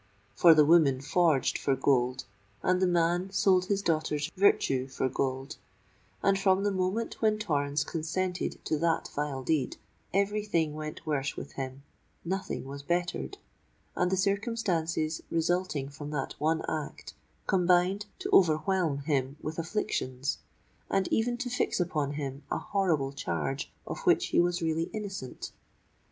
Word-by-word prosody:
For 165 Hz, -2 st, +7 dB
the 150 Hz, -1 st, +6 dB
woman 150 Hz, -5 st, +5 dB
forged 155 Hz, 0 st, +2 dB
for 135 Hz, -, +1 dB
gold—and 125 Hz, -, 0 dB
the 185 Hz, -, +4 dB
man 175 Hz, +1 st, +2 dB
sold 190 Hz, -2 st, +3 dB
his 200 Hz, +1 st, 0 dB
daughter's 155 Hz, -2 st, 0 dB
virtue 135 Hz, -9 st, +3 dB
for 130 Hz, 0 st, -1 dB
gold; 135 Hz, +2 st, -2 dB, 0.7 s
and 195 Hz, -1 st, +3 dB
from 190 Hz, 0 st, +3 dB
the 205 Hz, -, +2 dB
moment 190 Hz, +4 st, -2 dB
when 215 Hz, -1 st, +3 dB
Torrens 145 Hz, -7 st, 0 dB
consented 180 Hz, +3 st, -2 dB
to 155 Hz, -, 0 dB
that 165 Hz, 0 st, +1 dB
vile 145 Hz, -2 st, -2 dB
deed, 145 Hz, -3 st, 0 dB, 0.3 s
every 200 Hz, +2 st, +1 dB
thing 165 Hz, -7 st, 0 dB
went 155 Hz, 0 st, -6 dB
worse 145 Hz, -3 st, -1 dB
with -, -, -6 dB
him—nothing 140 Hz, +7 st, -6 dB
was 140 Hz, +1 st, -7 dB
bettered—and 175 Hz, -, -3 dB
the 190 Hz, -, +2 dB
circumstances 185 Hz, -6 st, 0 dB
resulting 165 Hz, -3 st, 0 dB
from 145 Hz, +1 st, -8 dB
that 145 Hz, -3 st, -3 dB
one 160 Hz, +1 st, +1 dB
act, 155 Hz, -2 st, -5 dB, 0.3 s
combined 185 Hz, +2 st, +2 dB
to 385 Hz, +1 st, -5 dB
overwhelm 160 Hz, -3 st, +3 dB
him 140 Hz, -1 st, 0 dB
with 155 Hz, +2 st, -5 dB
afflictions, 145 Hz, -7 st, -2 dB, 0.5 s
and 195 Hz, -2 st, +1 dB
even 240 Hz, +2 st, +1 dB
to 250 Hz, +1 st, -3 dB
fix 245 Hz, -4 st, 0 dB
upon 155 Hz, -5 st, 0 dB
him 140 Hz, -1 st, -4 dB
a -, -, 0 dB
horrible 165 Hz, -9 st, 0 dB
charge 135 Hz, -, -3 dB
of -, -, -5 dB
which -, -, +4 dB
he -, -, +3 dB
was 175 Hz, 0 st, +2 dB
really 165 Hz, 0 st, 0 dB
innocent! 195 Hz, -11 st, -6 dB
165 Hz, 140 wpm, -29 LUFS, 140-185 Hz, 0.7 s, For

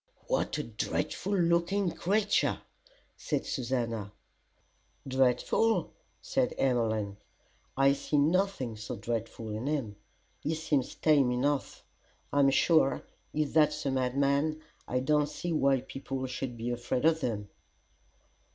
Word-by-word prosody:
"What -, -, 0 dB
a -, -, -2 dB
dreadful 200 Hz, +1 st, -2 dB
looking 175 Hz, +2 st, +2 dB
creature!" 205 Hz, +5 st, +1 dB, 0.6 s
said -, -, -2 dB
Susannah. 115 Hz, -6 st, -2 dB, 1.0 s
"Dreadful!" 130 Hz, -, +2 dB, 0.3 s
said 255 Hz, -2 st, 0 dB
Emmeline, 110 Hz, -6 st, 0 dB, 0.6 s
"I 135 Hz, 0 st, +5 dB
see 145 Hz, +1 st, -1 dB
nothing 155 Hz, -, +1 dB
so 105 Hz, -1 st, -5 dB
dreadful 115 Hz, -1 st, -4 dB
in 110 Hz, +5 st, -4 dB
him. 135 Hz, -9 st, -2 dB, 0.4 s
He 160 Hz, -, -2 dB
seems 150 Hz, -4 st, -1 dB
tame 145 Hz, -5 st, +3 dB
enough. 135 Hz, +3 st, -1 dB, 0.5 s
I'm 140 Hz, -1 st, +5 dB
sure, 140 Hz, 0 st, +3 dB, 0.3 s
if 150 Hz, -2 st, -1 dB
that's 150 Hz, -1 st, +3 dB
a 135 Hz, -, +1 dB
madman, 140 Hz, +4 st, +1 dB, 0.3 s
I 125 Hz, 0 st, 0 dB
don't 150 Hz, +2 st, +2 dB
see 170 Hz, +3 st, -3 dB
why 135 Hz, -4 st, +3 dB
people 135 Hz, 0 st, -5 dB
should 125 Hz, -1 st, -4 dB
be 120 Hz, +2 st, -3 dB
afraid 120 Hz, +3 st, -1 dB
of 160 Hz, 0 st, +4 dB
them." 105 Hz, -4 st, -2 dB
135 Hz, 120 wpm, -30 LUFS, 125-155 Hz, 1.0 s, I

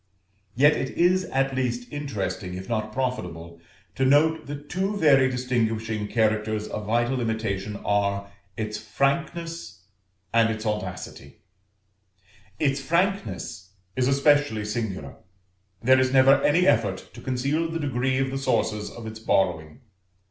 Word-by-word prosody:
Yet 145 Hz, +5 st, +6 dB
it 130 Hz, -, -2 dB
is 180 Hz, +2 st, +3 dB
at 135 Hz, -2 st, 0 dB
least 125 Hz, -2 st, -2 dB
interesting, 100 Hz, -10 st, -4 dB
if 95 Hz, +1 st, -7 dB
not 110 Hz, -2 st, -2 dB
profitable, 85 Hz, -10 st, -4 dB, 0.3 s
to 135 Hz, -, -1 dB
note 155 Hz, +3 st, +3 dB
that 145 Hz, 0 st, -7 dB
two 195 Hz, +5 st, -1 dB
very 135 Hz, -7 st, +5 dB
distinguishing 115 Hz, -4 st, -1 dB
characters 110 Hz, -1 st, 0 dB
of 105 Hz, -1 st, -5 dB
vital 120 Hz, +3 st, +1 dB
imitation 110 Hz, -3 st, -2 dB
are, 100 Hz, -1 st, 0 dB, 0.3 s
its 105 Hz, -1 st, -3 dB
Frankness 155 Hz, -, -2 dB, 0.5 s
and 115 Hz, -1 st, +4 dB
its 110 Hz, 0 st, -4 dB
Audacity; 105 Hz, -4 st, -5 dB, 1.1 s
its 140 Hz, +1 st, +1 dB
Frankness 105 Hz, -, -1 dB, 0.2 s
is 125 Hz, -1 st, +1 dB
especially 140 Hz, -5 st, +3 dB
singular; 105 Hz, -9 st, -4 dB, 0.7 s
there 130 Hz, +2 st, +6 dB
is 130 Hz, 0 st, +2 dB
never 135 Hz, +1 st, +6 dB
any 170 Hz, +6 st, +3 dB
effort 105 Hz, -, +1 dB
to -, -, -11 dB
conceal 140 Hz, +6 st, -1 dB
the 165 Hz, -, -3 dB
degree 130 Hz, -2 st, 0 dB
of 135 Hz, 0 st, 0 dB
the 135 Hz, -, -2 dB
sources 105 Hz, -5 st, 0 dB
of 120 Hz, -, -10 dB
its 110 Hz, 0 st, -7 dB
borrowing. 90 Hz, -, 0 dB
120 Hz, 135 wpm, -25 LUFS, 105-140 Hz, 1.1 s, Yet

